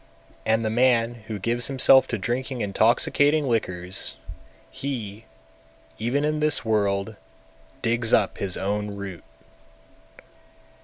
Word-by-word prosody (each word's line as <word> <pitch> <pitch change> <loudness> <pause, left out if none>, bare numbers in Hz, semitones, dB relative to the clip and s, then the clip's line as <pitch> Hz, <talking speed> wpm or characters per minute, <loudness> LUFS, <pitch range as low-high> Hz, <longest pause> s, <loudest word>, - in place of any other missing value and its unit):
And 110 +1 +2
the 110 - 0
man 120 -1 +1
who 110 - -4
gives 115 +4 +1
himself 135 0 +5
to 120 - -2
drinking 125 +4 -3
intoxicating 140 +8 +2
liquors, 95 -6 -2 0.6
he, 115 -6 -6 0.7
even 130 +6 0
in 155 0 -1
this 150 -4 +2
world, 105 -1 0 0.7
digs 115 0 +1
up 100 - +2
his 95 -2 -1
own 105 +1 -3
root. 100 -3 -8
115 Hz, 110 wpm, -24 LUFS, 100-125 Hz, 0.7 s, himself